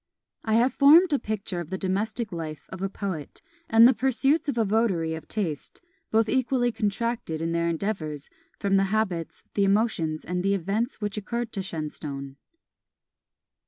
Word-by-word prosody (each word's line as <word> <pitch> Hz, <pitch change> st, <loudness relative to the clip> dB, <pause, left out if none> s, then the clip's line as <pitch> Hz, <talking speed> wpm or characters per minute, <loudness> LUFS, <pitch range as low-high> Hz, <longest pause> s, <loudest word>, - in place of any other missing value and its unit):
I 220 Hz, -1 st, +1 dB
have 245 Hz, +2 st, +3 dB
formed 310 Hz, +5 st, +7 dB
a 285 Hz, -, +3 dB
picture 205 Hz, -4 st, -4 dB
of 170 Hz, -2 st, -6 dB
the 190 Hz, -, -3 dB
domestic 210 Hz, +4 st, -2 dB
life 160 Hz, -3 st, -6 dB
of 190 Hz, -, -8 dB
a 195 Hz, -, -1 dB
poet, 185 Hz, -8 st, -5 dB, 0.3 s
and 225 Hz, +1 st, +8 dB
the 260 Hz, -, +5 dB
pursuits 270 Hz, +6 st, +1 dB
of 240 Hz, -, -2 dB
a 225 Hz, -, +3 dB
votary 195 Hz, -7 st, +1 dB
of 160 Hz, -1 st, -7 dB
taste, 170 Hz, -10 st, -4 dB, 0.3 s
both 225 Hz, 0 st, +3 dB
equally 250 Hz, -1 st, +1 dB
contracted 220 Hz, -5 st, -2 dB
in 165 Hz, +1 st, -2 dB
their 170 Hz, 0 st, +1 dB
endeavours, 160 Hz, -5 st, -3 dB, 0.3 s
from 195 Hz, -1 st, +2 dB
the 195 Hz, -, +3 dB
habits, 190 Hz, -5 st, -2 dB
the 200 Hz, -, +2 dB
emotions, 195 Hz, -6 st, +1 dB
and 180 Hz, 0 st, -2 dB
the 195 Hz, +2 st, +2 dB
events 205 Hz, -, -2 dB
which 210 Hz, 0 st, -3 dB
occurred 235 Hz, +2 st, -3 dB
to 195 Hz, -, -2 dB
Shenstone. 150 Hz, -5 st, -6 dB
200 Hz, 165 wpm, -26 LUFS, 170-230 Hz, 0.3 s, and